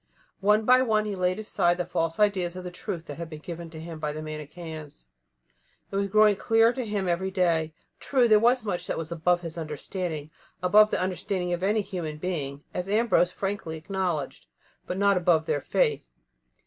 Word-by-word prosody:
One 210 +2 +3
by 255 +2 +6
one 215 -4 +2
he 210 - -2
laid 185 0 0
aside 175 -5 +1
the 180 - -1
false 165 +2 -2
ideas 190 -4 +2
of 185 - -6
the 180 - -6
truth 170 -1 -5
that 145 0 -8
had 170 -1 -5
been 155 - -7
given 170 +2 -7
to 160 -1 -10
him 165 0 -8
by 150 -1 -2
the 155 +1 -6
Manicheans. 155 - -8 0.9
It - - -5
was 200 0 +1
growing 210 0 +5
clearer 225 +2 +4
to 255 -3 -4
him 205 -3 -1
every 180 +2 0
day. 165 -4 +1 0.2
True, 255 -3 +2
there 215 -2 +6
was 240 +1 +3
much 180 -4 -2
that - - -2
was 165 0 -3
above 175 +1 +1
his 165 -1 -6
understanding 155 0 -5 0.3
above 210 +4 +6
the - - 0
understanding 185 0 -2
of 175 - -2
any 210 +3 +2
human 175 -6 -5
being, 150 -5 -4
as 180 +2 -3
Ambrose 210 -4 +3
frankly 195 -5 -4
acknowledged 170 -4 -3 0.4
but 180 - -3
not 200 -1 +3
above 170 -3 +3
their 155 -3 0
faith. - - +1
180 Hz, 195 wpm, -27 LUFS, 160-205 Hz, 0.9 s, by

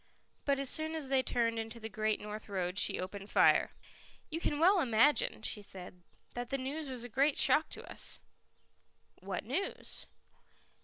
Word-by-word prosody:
But 280 -1 +2
as 275 0 -1
soon 315 +3 +1
as 295 -4 -3
they 270 -1 +4
turned 230 -3 0
into 225 +1 -5
the 220 - -5
Great 215 0 0
North 210 +1 -7
Road 185 -1 -1
she - - +3
opened 195 +2 -6
fire. - - +5 0.6
"You 325 - -2
can 295 - 0
well 370 +4 +6
imagine," 240 +2 +3
she 210 - 0
said, 180 -2 -7 0.3
"that 245 0 -4
the 275 - 0
news 275 +3 -4
was 250 -2 -5
a - - -5
great 275 +5 +2
shock - - +4
to - - -9
us." - - -1 1.0
"What - - -4
news?" 390 - -4
245 Hz, 170 wpm, -33 LUFS, 210-280 Hz, 1.0 s, well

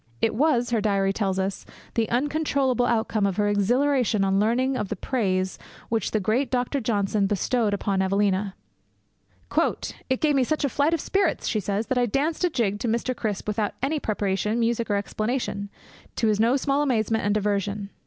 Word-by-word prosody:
It 225 - +1
was, 245 -1 +2
her 230 -3 +2
diary 195 -2 +1
tells 195 -2 -1
us, 190 +1 -2 0.3
the 225 -2 0
uncontrollable 270 -2 +1
outcome 220 -3 +1
of 190 - -3
her 210 -1 +2
exhilaration 235 +2 +2
on 195 0 +2
learning 250 +5 +1
of 210 - -2
the - - -2
praise 190 -4 -1 0.3
which 225 -3 0
the 215 - 0
great 220 +7 0
Dr. 250 +2 0
Johnson 205 -2 +1
bestowed 205 +1 0
on 195 -2 +1
Evelina. 195 0 +1 1.0
'It 260 0 -1
gave 305 -1 +2
me 270 -2 +3
such 310 +3 0
a - - 0
flight 290 +6 +2
of 320 - -4
spirits,' 390 -3 0
she 215 - 0
says, 205 +2 -2
'that 255 0 0
I 245 - +2
danced 295 - -1
a 360 - +3
jig 210 -9 -1
to 235 - -2
Mr. 235 +3 0
Crisp, 210 -4 -3
without 210 -1 -1
any 300 +3 0
preparation, 210 0 -1
music, 235 0 0
or 205 - +2
explanation, 205 0 -2 0.5
to - - 0
his 210 -1 +1
no 230 +4 +4
small 275 +1 +1
amazement 225 -5 +1
and 205 0 +1
diversion.' 205 -1 -1
220 Hz, 185 wpm, -25 LUFS, 200-255 Hz, 1.0 s, no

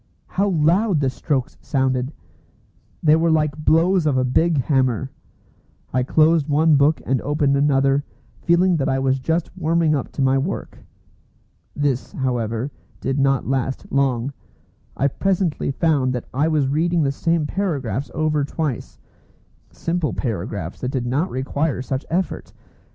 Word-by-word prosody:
How 200 +2 0
loud 175 +3 +2
the 135 -2 +1
strokes 130 -1 -2
sounded! 130 -1 0 0.9
They 155 -1 +6
were 165 +1 +2
like 150 -2 +2
blows 165 +2 +3
of 140 -3 +2
a 130 - +2
big 160 +6 +2
hammer. 130 -2 +1 0.8
I 130 - +2
closed 155 +3 +3
one 155 +1 +4
book 145 +3 +3
and 130 -1 0
opened 145 -1 +1
another, 140 0 +2 0.4
feeling 175 +1 +3
that 135 - 0
I 135 - +1
was 135 0 +1
just 160 +7 -2
warming 165 -2 +1
up 140 -4 -2
to 140 - -1
my 135 0 +3
work. 165 +9 -4 1.0
This, 140 -3 -1
however, 120 0 -2 0.3
did 135 +2 -1
not 135 -1 +2
last 135 0 -2
long. 135 -1 0 0.6
I 140 - +2
presently 185 +1 0
found 140 -3 +1
that 125 - -4
I 145 +4 +1
was 150 -4 +1
reading 165 +4 +1
the 140 - +1
same 165 +2 0
paragraphs 145 - -2
over 155 -2 +1
twice, 145 -3 -4 0.7
simple 165 -2 -2
paragraphs 100 - -4
that 125 - -1
did 130 -2 -2
not 140 +9 0
require 135 +1 -2
such 130 +1 -4
effort. 180 +3 -2
140 Hz, 145 wpm, -21 LUFS, 130-160 Hz, 1.0 s, They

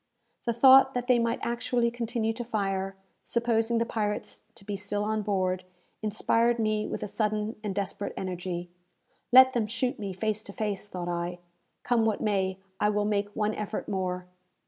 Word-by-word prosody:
The 235 - +1
thought 265 +2 +7
that 245 0 -1
they 250 -1 +4
might 230 0 +1
actually 235 0 0
continue 230 -1 -1
to 240 +2 -5
fire, 195 -4 -2 0.3
supposing 235 -1 +1
the 230 - +2
pirates 210 -2 -3
to 195 - -11
be 205 -1 -3
still 205 +1 -2
on 215 0 0
board, 185 -3 0 0.4
inspired 230 +2 +2
me 215 -1 0
with - - -4
a - - -2
sudden 215 +1 -1
and 200 -3 -3
desperate 200 0 -3
energy. 180 -1 -4 0.6
"Let 260 +1 +9
them 230 -3 +1
shoot 250 +3 -1
me 200 -2 -3
face 215 +2 -1
to 200 - -10
face," 210 -1 -3
thought 180 -3 -5
I. 175 0 -2 0.5
"Come 240 -2 +2
what 220 -2 +1
may, 190 -3 0 0.2
I 210 - +3
will 210 0 +1
make 205 -1 0
one 215 0 +1
effort 210 0 -4
more!" 180 -2 -2
210 Hz, 175 wpm, -28 LUFS, 195-235 Hz, 0.6 s, Let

